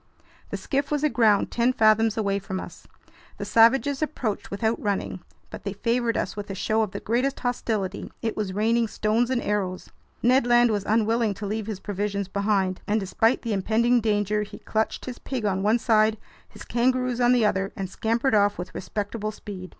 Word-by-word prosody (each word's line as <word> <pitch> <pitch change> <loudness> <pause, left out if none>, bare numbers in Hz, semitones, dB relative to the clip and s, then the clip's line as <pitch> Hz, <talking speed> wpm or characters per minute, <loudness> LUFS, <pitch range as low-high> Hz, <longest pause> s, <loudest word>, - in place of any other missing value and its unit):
The - - -3
skiff 280 0 -2
was 295 -1 -1
aground 225 -8 +3
ten 240 +2 +2
fathoms 220 -1 +3
away 200 -2 0
from 190 -1 -5
us. - - -10 0.5
The - - -5
savages 265 +5 +4
approached 255 -9 -3
without 220 +3 -1
running, 200 -2 -2 0.3
but - - -8
they 200 - -3
favored 230 +2 0
us - - -2
with 205 -1 -6
a 195 - -4
show 220 +3 0
of 215 - 0
the - - -6
greatest 250 +5 -1
hostility. 225 -6 -2
It 225 - -2
was 205 -3 -2
raining 225 +4 +1
stones 220 +3 0
and 255 -2 0
arrows. 190 -3 -2 0.3
Ned 250 +1 +4
Land 240 -1 +5
was 205 -2 -1
unwilling 225 0 +2
to 205 - -6
leave 215 +1 -3
his 210 -4 -4
provisions 200 -1 -3
behind, 195 -2 0
and 215 +2 +2
despite 225 +4 +1
the 230 -3 -1
impending 230 +5 +2
danger, 210 -1 +1
he 210 - -7
clutched 220 0 -2
his 250 -1 -7
pig 255 -5 -4
on 190 -2 0
one 215 +4 +3
side, 220 -2 +3 0.3
his - - -12
kangaroos 250 0 0
on 245 0 +5
the 245 -3 +4
other, 195 -2 0
and 195 - -4
scampered 230 +7 0
off 205 -1 +3
with 180 +1 -6
respectable 210 +3 -4
speed. 195 -3 -9
220 Hz, 190 wpm, -25 LUFS, 200-235 Hz, 0.5 s, Land